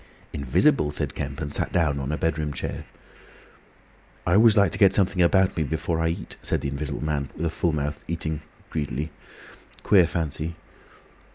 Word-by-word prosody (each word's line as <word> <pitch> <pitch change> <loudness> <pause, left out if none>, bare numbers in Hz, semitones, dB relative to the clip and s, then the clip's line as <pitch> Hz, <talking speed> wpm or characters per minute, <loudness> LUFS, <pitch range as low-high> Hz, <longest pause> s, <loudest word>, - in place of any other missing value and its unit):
"Invisible!" 75 - +2
said - - -2
Kemp, 70 +2 -5
and 70 -2 -3
sat - - +1
down 75 -5 +1
on 70 +1 -3
a 75 - -1
bedroom 80 -2 -1
chair. - - -5 1.4
"I 85 - +2
always 110 +2 +6
like 100 -4 +5
to - - -5
get 100 -2 +6
something 95 -2 +2
about 95 +2 +4
me 80 - -1
before 80 +2 -1
I 80 - +1
eat," 80 - -4
said - - -1
the 70 - -2
Invisible 70 +1 -4
Man, 70 -3 -1
with 85 - -3
a 80 - 0
full 85 +1 0
mouth, 75 -1 -3
eating 80 -2 -3 0.3
greedily. 75 0 -3 0.7
"Queer 90 -5 +5
fancy!" 80 0 -3
80 Hz, 175 wpm, -25 LUFS, 75-85 Hz, 1.4 s, always